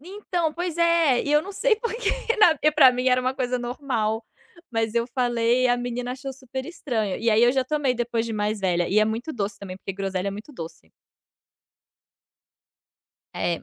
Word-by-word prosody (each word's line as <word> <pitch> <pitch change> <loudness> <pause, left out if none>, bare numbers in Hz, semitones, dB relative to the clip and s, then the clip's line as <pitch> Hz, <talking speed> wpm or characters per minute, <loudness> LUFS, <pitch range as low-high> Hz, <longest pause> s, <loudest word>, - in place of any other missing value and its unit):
Então, 355 -2 -3
pois 345 0 -4
é, 335 -6 +3
e 290 - -1
eu 300 - +5
não 395 - -8
sei 455 +3 +2
porque 460 -1 -2 0.3
na 350 -7 +6 0.2
pra 270 -4 +7
mim 250 +1 0
era 255 0 +3
uma 255 +1 -1
coisa 250 -1 -1
normal, 240 -3 -2 0.5
mas 225 -1 -1
eu 235 0 +1
falei 240 0 +2
e - - +4
a 245 - +3
menina 245 0 -3
achou 265 +1 -6
super 260 0 -7
estranho. 235 - -2
E 230 0 +1
aí 215 +2 +4
eu 240 - +6
já 265 -1 +1
tomei 280 -2 0
depois 235 -1 -1
de 230 - -4
mais 210 0 -1
velha, 175 -2 +1
e 200 - +3
é 215 - +5
muito 230 +8 -3
doce 205 -4 -3
também, 190 -2 -8
porque 195 - -6
groselha 195 -1 -2
é - - -2
muito 210 +9 -9
doce. 160 - -10 2.4
É. 170 -1 -2
245 Hz, 195 wpm, -24 LUFS, 220-290 Hz, 2.4 s, pra